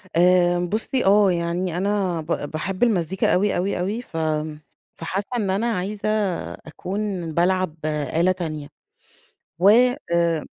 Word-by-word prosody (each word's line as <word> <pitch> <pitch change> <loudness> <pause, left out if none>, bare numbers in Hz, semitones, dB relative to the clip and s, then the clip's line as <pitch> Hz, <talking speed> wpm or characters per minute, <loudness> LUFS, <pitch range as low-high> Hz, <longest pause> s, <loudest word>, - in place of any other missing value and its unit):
آآ 175 0 +4
بُصي 215 +8 -1
آه 200 0 +5
يعني 170 0 -1
أنا 190 -3 0
ب - - -11 0.3
باحب 185 +6 -2
المزيكا 190 -5 +1
أوي 200 +3 +2
اوي 185 +1 -1
اوي 200 +6 -2
ف 170 - -9 0.8
فحاسة 190 +4 -3
إن 205 -4 -1
أنا 195 +5 0
عايزة 200 +2 -3 0.4
أكون 185 +1 -5
بالعب 180 -1 +1
آلة 155 +4 +1
تانية، 155 -5 -4 0.9
و 185 +3 +5 0.4
آآ، 170 -2 +1
180 Hz, 125 wpm, -23 LUFS, 170-200 Hz, 0.9 s, آه